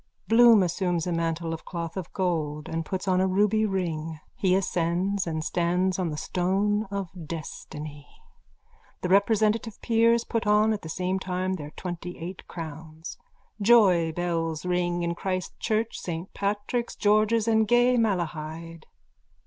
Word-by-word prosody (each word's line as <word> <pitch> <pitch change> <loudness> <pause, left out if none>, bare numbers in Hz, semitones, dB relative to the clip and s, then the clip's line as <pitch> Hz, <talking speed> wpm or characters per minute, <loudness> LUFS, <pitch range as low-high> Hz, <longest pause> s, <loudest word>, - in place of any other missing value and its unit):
_(Bloom 230 -2 +7
assumes 175 -1 -1
a 180 - -2
mantle 165 0 -1
of 160 - -7
cloth 170 -2 -5
of 190 -4 -5
gold 155 -5 -1
and 165 0 -2
puts 190 0 -3
on 185 -1 +3
a 190 - +3
ruby 210 +3 +2
ring. 165 -5 -3 0.2
He 185 -2 +2
ascends 185 +1 0
and 160 -1 -2
stands 180 +3 0
on 180 -3 0
the 150 - -4
stone 195 +6 0
of 195 -2 -4 0.2
destiny. 150 -2 -7 0.9
The 180 - -2
representative 215 +2 +2
peers 230 0 +3
put 230 -3 -2
on 210 +1 +4
at 210 - -4
the 160 - -8
same 185 +3 -1
time 185 0 -2
their 150 -5 -5
twentyeight 180 0 -6
crowns. 160 0 -8 0.4
Joybells 175 -6 +3
ring 175 -1 0
in 170 0 0
Christ 185 +1 -4
church, 220 0 -1
Saint 170 +1 -5
Patrick's, 205 +4 -2
George's 215 +1 +3
and 220 -1 +3
gay 245 +2 +4
Malahide. 165 -6 -2
185 Hz, 140 wpm, -26 LUFS, 165-210 Hz, 0.9 s, Bloom